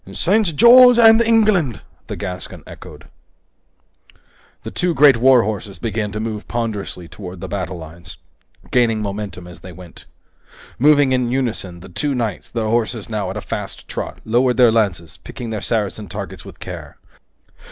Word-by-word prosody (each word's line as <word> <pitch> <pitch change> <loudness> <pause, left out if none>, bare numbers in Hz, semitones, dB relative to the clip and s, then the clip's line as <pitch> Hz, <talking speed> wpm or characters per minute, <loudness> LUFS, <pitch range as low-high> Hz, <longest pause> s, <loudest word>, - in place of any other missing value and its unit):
"St. 180 - +1
George 245 - +8
and 225 -1 +7
England!" 215 - +2 0.3
the - - -5
Gascon 90 -1 -7
echoed. - - -12 1.7
Two 180 -2 -1
great 140 -3 +6
war 125 0 +5
horses 105 -2 -5
began 110 -3 -3
to 105 - -5
move 110 -1 -5
ponderously 110 -6 -4
forward 85 - -14
toward 90 -3 -9
the - - -5
battle 95 -2 -4
lines, 85 +1 -12 0.5
gaining 115 -3 +2
momentum 100 -3 -6
as 90 -2 -12
they 90 +2 -11
went. 90 -1 -14 0.7
Moving 145 0 +4
in 125 -2 +1
unison, 115 -9 -3
the 95 - -12
two 140 - -2
knights, 115 -6 -3
their 115 -2 -3
horses 115 0 -1
now 105 -3 -3
at - - -5
a - - -4
fast - - -6
trot, - - -6
lowered 125 +3 +1
their 125 -3 +6
lances, 95 -8 -1
picking 115 -2 -8
their 110 -2 -4
Saracen 105 -2 -2
targets - - -7
with - - -13
care. - - -9
115 Hz, 160 wpm, -19 LUFS, 100-130 Hz, 1.7 s, George